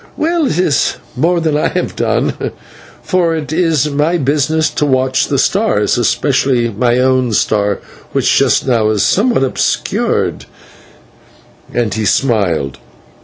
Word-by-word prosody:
"Well, 330 -2 0
it 160 - -2
is 155 -7 +1 0.2
more 170 +7 +1
than 160 -2 0
I 150 - +1
have - - -3
done, - - 0 0.7
for 170 -3 +1
it 155 -2 -4
is 160 -4 +1
my 150 +5 +1
business 150 +2 0
to - - -2
watch 130 -1 +1
the - - -1
stars, - - +1
especially 120 -3 +1
my 120 +3 0
own 130 -2 +1
star, 105 -1 +1 0.3
which - - +1
just - - +2
now 115 -5 +2
is 105 -2 +1
somewhat 230 - +2
obscured," 130 - -1 1.3
and 115 -4 -1
he 110 +1 -2
smiled. 95 - 0
135 Hz, 135 wpm, -14 LUFS, 120-160 Hz, 1.3 s, just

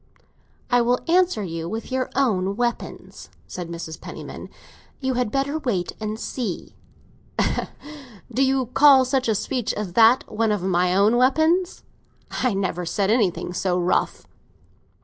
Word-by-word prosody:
"I 245 0 +5
will 245 +1 +2
answer 355 - +2
you 165 -2 -5
with 225 +5 -5
your 260 0 -1
own 200 -8 +1
weapons," 240 +1 -4 0.2
said 175 -2 -7
Mrs. 165 -1 -7
Penniman. - - -8 0.5
"You 265 -1 -1
had 245 -2 0
better 280 +3 -1
wait 205 - -1
and 215 0 -4
see!" 230 -9 -4 1.6
"Do 255 - 0
you 265 -1 +2
call 265 +2 +6
such 260 0 0
a 220 - +2
speech 245 +2 -2
as 205 -4 -4
that 230 +5 +6
one 225 0 0
of 205 -4 -1
my 180 -1 +1
own 210 +4 +4
weapons? 315 +8 +2 0.5
I 250 -6 0
never 185 -2 -2
said 195 +4 0
anything 200 -6 0
so 180 0 0
rough." 180 0 0
225 Hz, 145 wpm, -23 LUFS, 185-260 Hz, 1.6 s, call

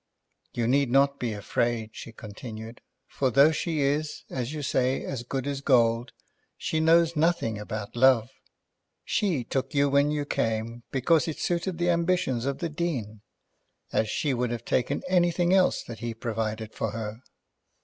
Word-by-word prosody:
"You 120 - 0
need 135 +2 +2
not 140 +2 +3
be 120 -2 -1
afraid," 110 +2 -1
she 115 - -9
continued, 110 +1 -9 0.3
"for 135 - 0
though 140 +5 +6
she 160 0 -1
is, 145 +2 -1
as 125 0 -3
you 150 -1 -5
say, 130 0 +1
as 130 -3 -4
good 130 +2 -4
as 140 -1 -3
gold, 120 -3 +3 0.5
she 160 - -1
knows 165 +1 +4
nothing 155 -9 +1
about 105 0 -6
love. 125 -1 +4 0.7
She 175 - 0
took 135 +4 -3
you 140 0 +4
when 140 +1 +3
you 150 -1 -1
came 115 -2 -2
because 150 +5 +2
it 160 - -3
suited 175 0 -1
the 175 +1 +2
ambition 170 -8 +1
of 140 - -1
the 170 - -3
Dean, 135 -10 -3 0.7
as 110 - +1
she 140 +5 0
would 125 -1 0
have 120 -1 -4
taken 135 +5 0
anything 175 -1 +2
else 190 -1 +3
that 115 -3 -9
he 115 0 -4
provided 110 -1 -3
for 110 - -2
her." 110 0 -5
130 Hz, 165 wpm, -27 LUFS, 115-155 Hz, 0.7 s, though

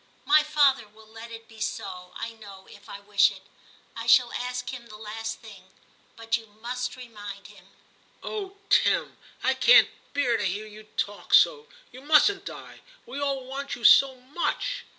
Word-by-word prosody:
My 310 -5 +6
father 285 -6 +2
will 220 +1 -19
let 225 +1 -11
it 225 0 -11
be 225 -1 -16
so, 180 -3 -5
I 230 - -5
know, 200 -4 -13
if 205 0 -16
I 200 - -8
wish 205 0 +4
it; 190 -1 -12 0.5
I 230 0 -6
shall 240 +1 +5
ask 250 0 -4
him 240 -2 -9
the 215 -2 -12
last 225 +1 -6
thing. 200 -5 -14 0.5
But 230 0 -1
you 225 -1 -14
must 245 +4 -5
remind 205 -5 -10
him.' - - -16 0.3
* - - -30
Oh! 400 -2 -6
Tim, - - +2 0.2
I - - +3
can't - - +6 0.3
bear 250 -5 +2
to 210 - -3
hear 200 +3 -2
you 215 0 -13
talk 205 0 0
so. 460 -2 +4 0.2
You 255 - -12
mustn't 315 +7 +4
die; - - -10 0.2
we 280 - -7
all 275 -2 -2
want 275 +2 -5
you 240 - -13
so 270 +1 +7
much. 345 - -3
230 Hz, 180 wpm, -26 LUFS, 210-270 Hz, 0.5 s, so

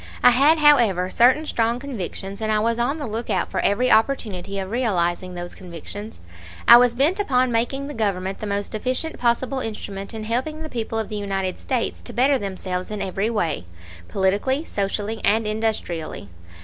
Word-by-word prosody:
I 245 - +8
had, 285 +6 +5
however, 235 - +4
certain 255 +6 +4
strong 235 -4 0
convictions; 200 -6 -6
and 215 0 0
I 215 - +3
was 230 +2 +1
on 260 +6 0
the 295 - -4
lookout 225 +1 -2
for - - -1
every 245 +5 +2
opportunity 205 -6 +1
of 190 0 -4
realizing 185 -6 0
those 175 0 -6
convictions. 190 +4 -9 0.5
I 235 - +11
was 245 -1 +4
bent 300 +10 +2
upon 255 -9 +2
making 245 +4 0
the 295 - -6
Government 195 -4 -2
the 215 - -4
most 200 +1 -3
efficient 255 +8 -2
possible 250 +3 +1
instrument 200 -4 -5
in 220 - -5
helping 260 +8 -2
the 310 - -6
people 225 -3 -3
of 220 -2 -2
the 215 - -4
United 195 -2 -2
States 250 -4 -2
to - - -10
better 265 +2 +3
themselves 185 -2 -4
in 210 -1 -4
every 195 +3 -1
way, 190 - -1 0.4
politically, 205 - 0
socially, 205 +1 -2
and 220 +2 +3
industrially. 210 - -3
220 Hz, 175 wpm, -23 LUFS, 195-250 Hz, 0.5 s, I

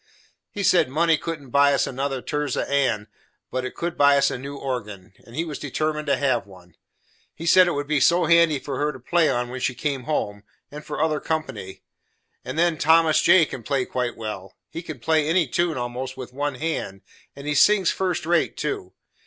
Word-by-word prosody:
He 200 - -5
said 180 -7 +4
money 165 +4 +3
couldn't 150 -4 -6
buy 140 +1 +4
us - - +1
another 135 0 -3
Tirzah 150 -3 -2
Ann, 130 -7 0 0.4
but 130 0 -2
it 130 - -7
would 170 0 -3
buy 145 0 +6
us 140 0 +3
a - - -3
new 140 +2 -7
organ, 105 -9 -6
and 115 - -13
he 165 +3 -1
was 150 -3 -6
determined 150 +1 -2
to 140 - +2
have 130 -7 0
one. 90 -3 -17 0.6
He 165 - -8
said 185 +2 +6
it 175 - 0
would 145 0 -2
be 150 0 +1
so 170 +6 +4
handy 170 -3 +4
for 135 0 -5
her 150 +1 +1
to 130 - -11
play 165 +5 +2
on 120 0 -1
when 130 +1 -6
she 125 - -1
came 135 0 -3
home, 105 -9 -2 0.3
and 150 +1 -8
for 150 - -6
other 155 -1 +1
company. 135 -13 -4 0.6
And 130 +4 -6
then 170 -2 +2
Thomas 160 0 +4
J. 175 -1 +6
can 130 - -8
play 130 +2 -1
quite 125 -2 -3
well; 105 -4 -7 0.2
he 165 - -5
can 155 -4 -8
play 155 +4 +1
any 165 +1 +3
tune, 170 +4 0
almost, 125 +2 -5
with 125 -1 -8
one 145 +1 -2
hand, 125 -10 -4 0.3
and 140 - -10
he 150 - -1
sings 190 +5 +4
first 185 -4 -2
rate, 170 0 +1
too. 140 -11 -4
145 Hz, 210 wpm, -23 LUFS, 125-160 Hz, 0.6 s, buy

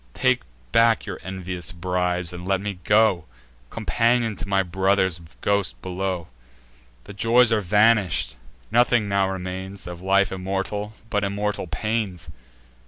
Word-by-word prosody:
Take - - +2 0.3
back 115 -2 +4
your 100 -3 -6
envious 90 -3 -5
bribes, 90 -1 -1
and 90 0 -7
let 95 -1 +2
me 100 -2 -5
go 105 -5 +4 0.4
Companion 115 -1 +1
to 90 - -6
my 95 -1 +2
brother's 95 -1 +1 0.2
ghost 100 -2 0
below! 95 -1 -3 0.8
The 100 - -10
joys 115 +3 +4
are 110 -2 +3
vanish'd: 100 - +3 0.4
nothing 120 -2 +3
now 100 -1 +1
remains, 95 +1 -5
Of 90 0 -8
life 100 +1 +3
immortal, 95 +3 -3 0.2
but 105 -1 +1
immortal 100 0 -2
pains. 95 -1 -3
95 Hz, 130 wpm, -24 LUFS, 90-105 Hz, 0.8 s, back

